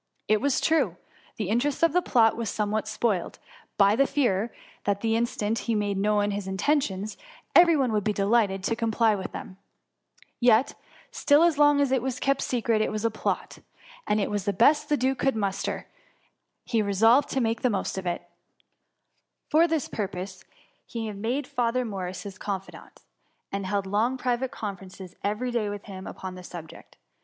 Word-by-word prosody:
It 215 -1 +3
was 280 0 +2
true, 270 - +1 0.4
the 210 -4 -2
interest 260 +8 0
of 330 -2 +4
the 360 - +3
plot 230 -8 +3
was 230 -2 -3
somewhat 215 +1 -1
spoiled, 215 -4 -1 0.4
by 200 0 +5
the 275 +3 +3
fear 230 -5 +1 0.3
that 200 -1 0
the 225 -1 +1
in 235 +1 +2
stant 220 0 -2
he 230 - +2
made 205 -1 0
known 205 0 +2
his 200 -1 -4
intentions, 205 -1 0 0.4
every 340 -2 +7
one 260 -4 +1
would 210 -2 0
be 215 - +1
delighted 200 -1 +1
to 230 - 0
comply 225 -1 +2
with 195 -2 -4
them: 185 - -8 0.8
yet 240 +1 +4 0.4
still, 290 +2 +4
as 335 -4 +3
long 290 -1 +5
as 280 -2 +2
it 265 -2 +2
was 255 0 -3
kept 275 0 +1
secret, 230 -3 0
it - - 0
was 215 +1 -3
a 230 - +2
plot, 215 - -3 0.5
and 210 - +2
as - - +1
it - - -3
was 205 -2 -2
the 200 - +1
best 285 - +4
the 295 - +3
duke 260 +1 0
could 270 -2 +1
muster, 200 -2 -2 0.8
he 230 -3 +1
resolved 225 +7 +4
to 270 - 0
make 230 -2 0
the 255 - +2
most 200 -4 -2
of 190 -1 -4
it 175 - -3 1.2
For 320 +3 +5
this 320 -4 -1
purpose 190 -2 -5 0.4
he 225 -2 -5
made 230 +8 -2
Father 250 -2 0
Morris 190 -4 -5
his 200 -1 -9
confidant, 195 -2 -7 0.5
and 195 -1 -3
held 200 0 -1
long 220 +7 +1
private 250 0 -1
conferences 190 -4 -8
every 215 +5 -1
day 225 -4 0
with 205 0 -6
him 190 -2 -9
upon 190 -1 -7
the 185 - -9
subject. 170 -2 -11
220 Hz, 185 wpm, -26 LUFS, 200-255 Hz, 1.2 s, every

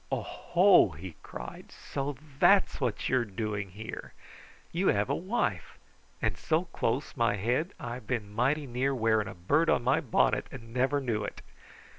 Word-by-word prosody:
"O - - -1
ho!" 180 - +4
he 90 +1 -8
cried. - - -9
"So 140 +1 -4 0.2
THAT'S 200 -6 +4
what 125 -5 -1
you 130 - +3
are - - +1
doing 105 -1 -3
here! 110 +4 -8 0.6
You 185 +3 0
have 100 0 +2
a - - +2
wife. 195 +8 -2 0.5
And - - +1
so 160 +2 +1
close 125 +6 -1
my 115 -1 +2
head 125 - -1
I 120 -7 -5
have 125 - -9
been 105 -5 -3
mighty 135 +7 +1
near 130 +2 0
wearing 110 -3 +2
a - - -7
bird 145 - +2
on - - +3
my 130 +5 +3
bonnet, 105 -4 +2
and 115 -3 -10
never 135 +3 +1
knew 115 -5 -1
it!" - - -6
125 Hz, 175 wpm, -29 LUFS, 105-145 Hz, 0.6 s, ho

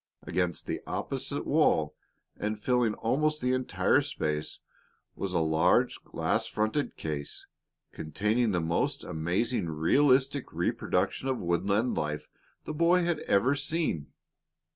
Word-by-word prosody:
Against 90 -2 -1
the - - -3
opposite - - -3
wall, - - +2 0.4
and 105 0 -3
filling 120 -2 +1
almost 150 +6 +1
the 125 0 +1
entire 130 0 +2
space, 75 0 -3 0.6
was 95 - -3
a 90 - +1
large 80 +10 +2
glass - - -1
fronted 110 +7 -1
case, 75 -3 -5 0.5
containing 105 +9 0
the 90 - +1
most 85 0 -1
amazingly 85 +4 -1
realistic 135 - +3
reproduction 90 +6 -1
of 130 -1 0
woodland 100 +7 +1
life 75 0 -3 0.4
the - - -4
boy 170 +3 +3
had 170 -2 0
ever 115 +8 +4
seen. 145 - -1
105 Hz, 120 wpm, -29 LUFS, 85-130 Hz, 0.6 s, ever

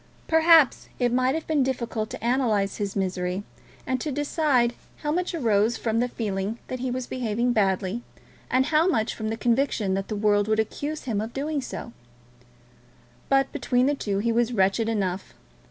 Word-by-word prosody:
Perhaps 320 -3 +5
it 245 -1 +1
might 255 +2 +2
have 320 - -3
been 310 -3 +1
difficult 235 -4 -2
to 230 - -5
analyse 225 -6 +1
his 200 -2 -3
misery, 185 0 -2 0.4
and 260 -1 -1
to 300 - -2
decide 285 -4 +1 0.3
how 295 - 0
much 360 +2 -1
arose 225 -5 +2
from 225 -1 0
the 245 - +2
feeling 205 -2 -3
that 255 - -4
he 255 +1 -2
was 250 0 -3
behaving 240 0 -1
badly, 195 +1 0 0.5
and 260 0 +3
how 310 +3 +3
much 230 -11 +1
from 220 -1 -4
the 225 - -3
conviction 235 -5 +1
that 195 0 -2
the 215 - -3
world 205 0 +2
would 215 0 +1
accuse 290 +7 -3
him 220 -5 -1
of 225 +2 -5
doing 290 +1 -2
so; 235 -2 -7 1.4
but, 270 0 +3
between 250 0 +1
the 285 - +2
two, 205 -8 -2
he 230 +4 +1
was 240 +1 +1
wretched 195 +2 +2
enough. 190 -4 -2
235 Hz, 180 wpm, -25 LUFS, 210-265 Hz, 1.4 s, Perhaps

